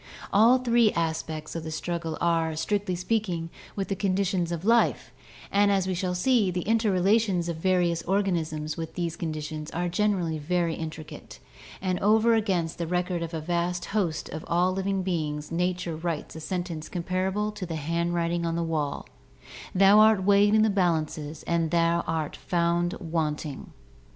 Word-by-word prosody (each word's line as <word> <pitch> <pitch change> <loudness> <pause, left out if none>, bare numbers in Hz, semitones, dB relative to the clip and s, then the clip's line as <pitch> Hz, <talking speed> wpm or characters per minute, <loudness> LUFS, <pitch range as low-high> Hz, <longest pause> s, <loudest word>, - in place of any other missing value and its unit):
All 230 +5 +6
three 240 -3 +3
aspects 160 -1 -3
of 165 - -4
the 160 - -5
struggle 165 0 -3
are, 165 -2 +1
strictly 195 +3 -1
speaking, 180 -3 -2 0.2
with 195 -1 -2
the 195 - -1
conditions 185 -2 0
of 170 +1 -4
life, 230 +1 +2 0.4
and 200 0 +4
as 195 -2 +2
we 190 - -1
shall 180 0 -2
see, 220 +1 +3
the 180 -1 -2
interrelations 205 -3 +2
of 170 -2 -3
various 175 -1 +1
organisms 165 -5 -1
with 165 -1 -6
these 170 -2 -2
conditions 155 -1 -5
are 175 +1 -2
generally 175 -4 0
very 170 +2 0
intricate, 155 -1 -8 0.5
and 185 -2 0
over 220 +3 +4
against 185 -8 0
the 170 - -2
record 180 0 -1
of 165 -1 -4
a 160 - -3
vast 175 +2 -1
host 175 -7 0
of 155 +1 -6
all 175 +2 +2
living 195 0 -1
beings 150 -5 -2
nature 175 -1 -1
writes 160 -1 -4
a - - -6
sentence 170 -1 -4
comparable 190 +4 -1
to 205 -3 -6
the 165 - -4
handwriting 170 +2 -1
on 165 0 -1
the 170 - 0
wall: 150 -5 -2 0.7
"Thou 195 +2 +7
art 215 -3 +5
weighed 205 +2 +5
in 215 - +5
the 220 - +3
balances, 160 -5 -1
and 165 -2 0
art 165 -2 0
found 175 0 0
wanting." 155 -4 -3
175 Hz, 160 wpm, -27 LUFS, 165-195 Hz, 0.7 s, Thou